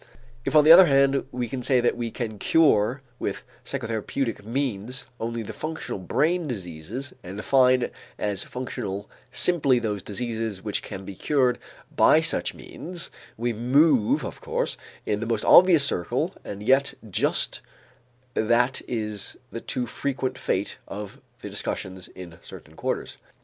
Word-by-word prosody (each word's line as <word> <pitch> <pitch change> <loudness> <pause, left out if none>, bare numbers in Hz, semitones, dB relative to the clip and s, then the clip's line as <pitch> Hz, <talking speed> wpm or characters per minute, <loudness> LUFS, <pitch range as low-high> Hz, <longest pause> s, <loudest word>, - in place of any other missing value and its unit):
If - - -1
on 150 - +8
the 155 - +8
other 180 +2 +10
hand 140 -1 +3
we 125 -1 -2
say 130 +1 +1
that 120 - +2
we 120 -1 -3
can 110 -3 -5
cure 135 -4 +3 0.2
with - - -3 0.2
psychotherapeutic 115 +2 -3
means 125 0 -3
only 115 0 -3
the - - -7
functional 160 -9 -5
brain 155 - +1
diseases 100 - -6
and 95 +2 -8
define 125 +1 +3 0.3
as 100 -2 -1
functional 110 -6 -5 0.2
simply 145 -5 +3
those 105 -4 -2
diseases 110 -1 -4
which 105 -2 -1
can 95 0 -8
be 100 - -6
cured 125 +3 +1 0.4
by - - +6
such - - 0
means, 175 0 -7 0.3
we 120 +1 -1
move, 125 +1 +3
of - - -7
course, - - -1 0.3
in 105 - 0
the 115 - -3
most 115 -2 -1
obvious 175 -4 +8
circle 85 -9 -1
and 100 0 -7
yet 135 +4 +3
just 100 - 0 0.7
that 120 +4 +2
is 105 -4 -3
the 115 - -5
too 125 - -2
frequent 130 +1 -2
fate 100 -5 -2
of 105 0 -7 0.2
the - - -6
discussions 95 -1 -4
in 85 -2 -11
certain - - -12
quarters. - - -3
120 Hz, 145 wpm, -25 LUFS, 105-135 Hz, 0.7 s, other